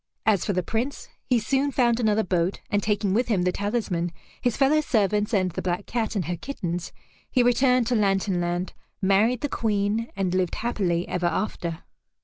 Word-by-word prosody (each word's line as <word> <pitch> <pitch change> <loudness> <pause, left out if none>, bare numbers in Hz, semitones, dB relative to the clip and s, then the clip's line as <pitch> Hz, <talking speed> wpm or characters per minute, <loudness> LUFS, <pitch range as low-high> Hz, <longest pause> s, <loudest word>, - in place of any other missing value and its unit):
As 210 -4 +3
for 205 - 0
the 180 0 0
Prince, 230 +9 -3 0.2
he 250 - +3
soon 270 +5 +1
found 240 -3 +2
another 220 -2 +2
boat, 180 0 0
and 205 - +2
taking 205 -2 0
with 240 +4 +2
him 200 -6 +1
the 180 - +2
talisman, 200 -5 -1 0.3
his 245 -3 0
fellow 285 +3 +4
servants, 210 -5 +1
and 185 -4 +1
the - - -4
black 180 +2 -2
cat 225 -2 -2
and 190 -5 0
her 175 +3 -2
kittens, 175 - -4 0.4
he 250 - +3
returned 250 0 +3
to 245 +2 +1
Lantern 195 -3 +1
Land, 175 +1 -2 0.3
married 210 +5 +3
the 290 - 0
Queen, 215 0 0
and 190 -2 -1
lived 185 -2 0
happily 185 -7 -1
ever 175 -1 0
after. 170 -2 -3
205 Hz, 185 wpm, -25 LUFS, 180-235 Hz, 0.4 s, fellow